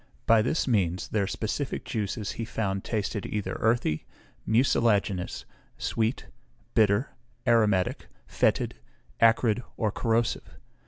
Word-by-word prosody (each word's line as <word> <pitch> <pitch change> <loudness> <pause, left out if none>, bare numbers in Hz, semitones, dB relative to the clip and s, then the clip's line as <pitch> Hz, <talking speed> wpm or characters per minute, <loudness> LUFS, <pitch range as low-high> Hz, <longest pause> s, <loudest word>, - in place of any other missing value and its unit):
By 115 -1 +5
this 140 +8 0
means 95 -7 +1
their 100 -3 0
specific 115 +7 -3
juices 105 -1 -3
he 115 - -5
found 100 -4 -2
tasted 105 -1 -2
either 105 -2 -3
earthy, 110 -9 +1 0.4
mucilaginous, 110 -5 +1 0.3
sweet, 115 +2 -1 0.5
bitter, 110 +3 +3 0.3
aromatic, 110 -6 +2 0.2
fetid, - - +1 0.5
acrid, 115 0 +4 0.2
or 110 -3 0
corrosive. 115 +1 -1
110 Hz, 105 wpm, -27 LUFS, 100-115 Hz, 0.5 s, By